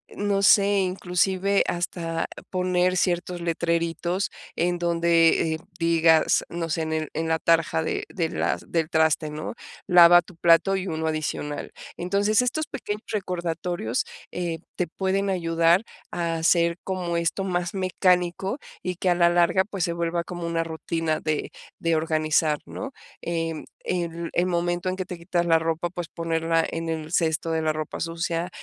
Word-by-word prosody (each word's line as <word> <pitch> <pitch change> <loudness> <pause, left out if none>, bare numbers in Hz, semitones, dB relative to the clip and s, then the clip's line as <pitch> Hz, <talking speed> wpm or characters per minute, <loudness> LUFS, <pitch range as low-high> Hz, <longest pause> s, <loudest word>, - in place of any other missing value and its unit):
no 200 -1 0
sé, 200 0 +5
inclusive, 190 +1 +1
hasta 165 -1 -2 0.2
poner 185 0 +1
ciertos 175 0 0
letreritos 170 +2 -1 0.2
en 175 +1 0
donde, 170 -1 +3
eh, - - -2 0.2
digas, 165 -1 +4
no 170 -1 -4
sé, 165 - 0
en 160 0 -2
el 155 -1 -2
en 160 +1 -2
la 160 0 +2
tarja 165 0 +2
de - - -2
de 165 -5 -1
las 170 - -1
del 165 -2 0
traste, 160 -1 +2
¿no?,"Lava 175 +2 +4
tu 175 - -16
plato 170 +3 +4
y 190 0 -3
uno 160 -2 -2
adicional". 155 -2 -3 0.2
Entonces, 200 +5 +2
estos 280 +6 -1
pequeños 210 -6 -5
recordatorios, 175 - -2 0.3
eh, 175 -2 -3 0.2
te 180 - -1
pueden 195 +3 -1
ayudar 170 0 +3 0.3
a 170 -1 -2
hacer 170 +1 +3
como 180 -3 -2
esto 170 +3 0
más 180 -1 -2
mecánico, 185 +2 +1 0.2
y 180 0 -3
que 185 +1 0
a - - +3
la 170 0 +5
larga, 175 +2 +3
pues, 195 -3 -4
se 170 - 0
vuelva 170 0 -1
como 175 -1 -5
una 165 0 0
rutina 165 -1 -2
de 155 -1 -2 0.3
de 165 -1 +1
organizar, 155 -1 +1
¿no? 270 +2 -7 0.3
Em, 165 -2 -3 0.2
el 170 -1 -3
el 175 - +2
momento 175 +1 0
en 185 - -2
que 185 -1 -4
te 180 0 -7
quitas 175 0 -1
la 165 -1 +4
ropa, 165 +1 -1
pues, 175 -2 -5
ponerla 165 0 0
en 165 0 -4
el 160 -1 -4
cesto 165 -1 +1
de 160 0 0
la 155 0 +1
ropa 155 -1 -5
sucia, 165 +1 -2
170 Hz, 160 wpm, -25 LUFS, 165-180 Hz, 0.3 s, sé